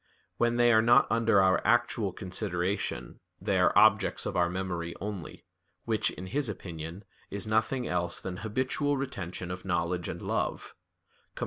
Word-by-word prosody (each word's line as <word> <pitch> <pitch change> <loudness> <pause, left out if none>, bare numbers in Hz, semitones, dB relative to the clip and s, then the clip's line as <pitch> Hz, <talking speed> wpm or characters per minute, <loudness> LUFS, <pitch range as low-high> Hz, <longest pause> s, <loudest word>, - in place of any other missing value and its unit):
When 120 0 +2
they 120 -1 +5
are 110 - +6
not 120 +4 +6
under 115 -3 +4
our 95 -1 +4
actual 115 -4 +2
consideration, 90 - -3 0.2
they - - 0
are - - +5
objects 110 -1 +4
of - - -3
our 85 -1 +2
memory 90 -2 -3
only, 100 -4 -6 0.4
which, - - +1
in 90 - -8
his 135 +5 -1
opinion, 85 -1 -7 0.3
is 100 +1 -2
nothing 110 +4 0
else 85 -1 0
than 90 -1 -5
habitual 130 +7 -1
retention 95 -9 -4
of 90 0 -6
knowledge 85 +1 -1
and - - -5
love - - -2 0.6
[*Cf. - - -9
100 Hz, 155 wpm, -29 LUFS, 90-115 Hz, 0.6 s, are